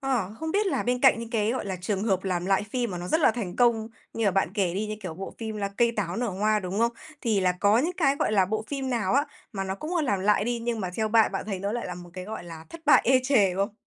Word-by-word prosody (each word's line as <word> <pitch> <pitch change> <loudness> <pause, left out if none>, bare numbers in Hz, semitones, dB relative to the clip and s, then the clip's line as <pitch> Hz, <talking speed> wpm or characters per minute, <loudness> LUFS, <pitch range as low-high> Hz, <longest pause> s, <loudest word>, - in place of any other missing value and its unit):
ờ, 240 -8 -1
không 320 0 -2
biết 410 +1 +2
là 385 - 0
bên 245 +1 0
cạnh 265 -3 +6
những 230 0 -6
cái, 220 -1 +1
gọi 255 - -3
là, 190 -2 -3
trường 195 +1 -2
hợp 195 -3 0
làm 180 -1 -1
lại 195 0 +2
phim 240 +1 -2
mà 180 - -4
nó 175 +1 -6
rất 320 - +2
là 300 - +5
thành 215 -6 -5
công 235 -3 +3 0.2
như 230 - -2
là 200 - +4
bạn 190 -2 +1
kể 185 -5 0
đi, 210 +2 -1
như, 215 0 -4
kiểu, 180 -4 -5
bộ 195 +3 -7
phim 220 -2 -4
là 200 -1 -2
Cây 235 -1 +3
Táo 185 -2 -2
Nở 245 0 -1
Hoa, 210 +2 +1
đúng 185 +2 -4
không? 235 +1 +2 0.3
Thì 220 -5 +1
là 180 -1 +3
có 205 +4 +3
những 320 +8 +1
cái, 280 -5 +2
gọi - - 0
là, 195 -3 +4
bộ 215 +2 -2
phim 270 -2 -3
nào 225 -6 0
á 285 +2 +3 0.3
mà 195 -1 -3
nó 190 0 -3
cũng, 310 - -5
ơ, 325 - +2
làm 205 -9 0
lại 205 +1 +3
đi, 240 0 -1
nhưng 230 -1 -2
mà 185 - -3
theo 220 -1 0
bạn, 220 -1 +4
bạn 195 - -3
thấy 195 -3 -3
nó 200 +2 -2
lại 240 0 -3
là 180 - -5
một 175 0 -11
cái, 185 0 -7
gọi 215 -3 -6
là, 165 -2 -9
thất 335 - -9
bại 295 - +7
ê 260 +1 +4
chề 210 -9 +3
không? 200 +3 -1
215 Hz, 315 wpm, -26 LUFS, 190-240 Hz, 0.3 s, bại